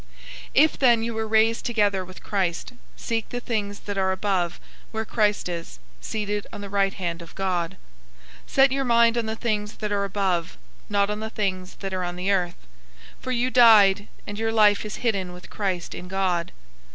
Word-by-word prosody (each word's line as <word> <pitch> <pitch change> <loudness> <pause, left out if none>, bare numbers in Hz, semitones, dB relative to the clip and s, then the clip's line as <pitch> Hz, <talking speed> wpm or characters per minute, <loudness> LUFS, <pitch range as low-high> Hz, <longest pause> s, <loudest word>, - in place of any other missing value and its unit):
003:001 - - -26 0.5
If 310 +3 +4
then 240 -4 +5
you 230 0 -2
were 220 0 -2
raised 220 +1 +3
together 205 -5 +1
with 185 0 -13
Christ, 190 +1 -2 0.2
seek 225 -2 -3
the 245 - -3
things 210 -4 -3
that 205 -1 -4
are 190 0 +2
above, 190 -3 -1 0.3
where 220 0 -3
Christ 210 -3 +1
is, 170 - -6 0.2
seated 210 -1 -3
on - - -8
the 200 -1 -7
right 195 -1 +1
hand 170 -2 -3
of 170 - -12
God. 180 -3 -1 0.7
003:002 - - -22
Set 270 0 +5
your 270 0 0
mind 235 -1 +4
on 235 -2 -1
the 220 - -2
things 210 -3 -2
that 210 -1 -4
are 200 -1 +1
above, 190 -4 -1 0.3
not 200 0 +2
on 210 - -3
the 220 0 -4
things 190 -4 -3
that 195 -1 -4
are 185 -1 -1
on 175 0 -3
the 185 +3 -1
earth. 175 - -1 0.5
003:003 - - -29
For 255 - -2
you 250 +1 +1
died, 210 -5 +6 0.2
and 205 +1 -6
your 225 0 0
life 210 -2 +4
is 215 -1 -5
hidden 190 -6 0
with 180 0 -12
Christ 185 -4 -2
in 180 - -8
God. 185 -3 -1
205 Hz, 200 wpm, -24 LUFS, 185-220 Hz, 0.7 s, died